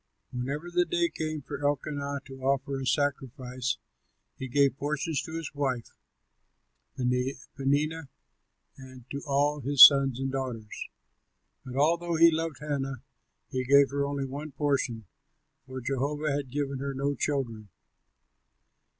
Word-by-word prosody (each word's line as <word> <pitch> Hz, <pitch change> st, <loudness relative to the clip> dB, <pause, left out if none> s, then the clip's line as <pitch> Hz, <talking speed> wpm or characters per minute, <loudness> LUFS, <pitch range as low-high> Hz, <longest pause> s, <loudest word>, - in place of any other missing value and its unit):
Whenever 140 Hz, +7 st, -4 dB
the 175 Hz, 0 st, +3 dB
day 170 Hz, 0 st, 0 dB
came 155 Hz, -2 st, -4 dB
for 140 Hz, +1 st, -6 dB
Elkanah 145 Hz, 0 st, -1 dB
to 135 Hz, -1 st, -11 dB
offer 135 Hz, 0 st, 0 dB
a 130 Hz, -, -4 dB
sacrifice 130 Hz, -2 st, -1 dB, 0.6 s
he 130 Hz, -, -6 dB
gave 140 Hz, +2 st, +3 dB
portions 150 Hz, +1 st, -1 dB
to 160 Hz, -, -8 dB
his 165 Hz, -4 st, -6 dB
wife 130 Hz, -5 st, -2 dB, 1.1 s
Peninnah 135 Hz, +4 st, -1 dB, 0.7 s
and 130 Hz, -2 st, -12 dB
to 140 Hz, -, -4 dB
all 145 Hz, +1 st, +2 dB
his 140 Hz, +1 st, +10 dB
sons 135 Hz, -3 st, +4 dB
and 135 Hz, 0 st, -2 dB
daughters; 125 Hz, -5 st, -5 dB, 0.7 s
but 130 Hz, -1 st, -8 dB
although 170 Hz, +4 st, +2 dB
he 165 Hz, +1 st, +7 dB
loved 160 Hz, -2 st, -3 dB
Hannah, 135 Hz, -4 st, -3 dB, 0.5 s
he 130 Hz, 0 st, -1 dB
gave 140 Hz, +2 st, +5 dB
her 140 Hz, 0 st, 0 dB
only 140 Hz, -1 st, -2 dB
one 145 Hz, +2 st, -6 dB
portion, 135 Hz, -6 st, -1 dB, 0.6 s
for 130 Hz, 0 st, -6 dB
Jehovah 140 Hz, +4 st, -1 dB
had 140 Hz, -2 st, -2 dB
given 140 Hz, 0 st, -2 dB
her 140 Hz, 0 st, -3 dB
no 140 Hz, +2 st, 0 dB
children. 120 Hz, -7 st, -2 dB
140 Hz, 135 wpm, -28 LUFS, 130-145 Hz, 1.1 s, his